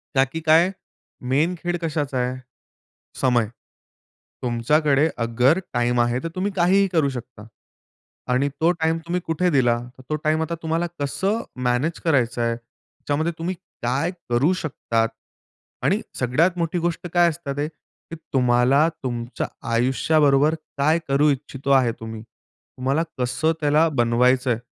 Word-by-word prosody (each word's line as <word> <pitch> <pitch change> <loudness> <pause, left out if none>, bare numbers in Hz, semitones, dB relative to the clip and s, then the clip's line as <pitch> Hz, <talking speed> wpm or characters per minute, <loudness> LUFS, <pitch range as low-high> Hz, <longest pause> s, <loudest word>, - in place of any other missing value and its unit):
का, 135 - +6
की 135 +5 -6
काय 165 +3 +4 0.6
मेन 155 +7 +2
खेळ 175 +1 -2
कशाचा 150 -5 -2
आहे? 125 +1 -1 0.8
समय. 120 -4 +3 1.0
तुमच्याकडे 140 +5 +2
अगर 125 +7 +2
टाईम 120 0 +1
आहे 120 +1 +1
तर - - -1
तुम्ही 190 +2 -1
काहीही 190 +2 +4
करू 155 -4 +3
शकता. 120 -4 -8 0.9
आणि 135 +3 +2
तो 165 +2 +5
टाईम 165 -1 0
तुम्ही 180 +1 -1
कुठे 165 +3 +1
दिला? 125 -6 +3 0.2
तर - - -13
तो 155 - 0
टाईम 155 +1 +2
आता 160 +1 -2
तुम्हाला 165 +2 0
कसं 195 +10 -1 0.3
मॅनेज 130 +7 0
करायचं 125 -7 +2
आहे? 115 0 +1
त्याच्यामध्ये 145 +6 -4
तुम्ही 175 +3 -3 0.3
काय 135 +8 0 0.2
करू 130 +9 +3
शकतात? 115 -7 -1 0.7
आणि - - +2 0.2
सगळ्यात 160 +9 +2
मोठी 170 0 -1
गोष्ट 170 +1 -2
काय 175 -1 +5
असतात 155 -4 -5
ते, 145 +1 0
की 160 +1 -14 0.2
तुम्हाला 125 +3 +4 0.2
तुमच्या 120 -1 -3 0.2
आयुष्याबरोबर 140 +4 +3 0.2
काय 155 +4 +3
करू 140 +2 +3
इच्छितो 140 0 -3
आहे 130 -3 +4
तुम्ही? 110 -1 -7
तुम्हाला 135 +5 -4 0.2
कसं 125 +6 +1
त्याला 150 +2 +4
बनवायचं 125 0 +2
आहे? 115 - 0
140 Hz, 140 wpm, -23 LUFS, 125-165 Hz, 1.0 s, का